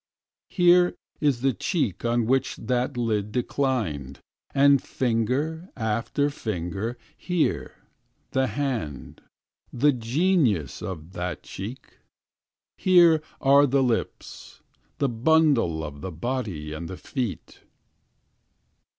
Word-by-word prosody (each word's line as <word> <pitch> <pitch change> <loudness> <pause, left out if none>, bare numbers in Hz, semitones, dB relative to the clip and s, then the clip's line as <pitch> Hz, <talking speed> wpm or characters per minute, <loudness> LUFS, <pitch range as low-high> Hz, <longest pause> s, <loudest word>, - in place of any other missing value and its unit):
Here 180 -1 +4 0.2
is 140 -6 +1
the 135 0 +2
cheek 120 - -1
on 120 -1 +1
which 130 +2 +1
that 125 +2 -2
lid 105 -3 -1
declined. 110 - -2 0.3
And, 140 -1 +5
finger 135 - -1
after 115 +6 0
finger, 105 - -4 0.2
here, 180 -3 -1 0.6
the 130 0 +1
hand. 120 - -4 0.5
The 145 +4 +3
genius 125 - +1
of 85 -3 -6
that 90 -1 -4
cheek. 115 +7 -8 0.8
Here 170 -4 +6 0.2
are 140 +1 +5
the 135 +1 +2
lips. 120 -3 -3 0.4
The 140 - +1
bundle 120 - +2
of 70 -2 -7
the 95 - -5
body 90 -5 -4
and 80 +2 -6
the 95 - -6
feet. 125 -8 -5
120 Hz, 105 wpm, -25 LUFS, 100-140 Hz, 0.8 s, Here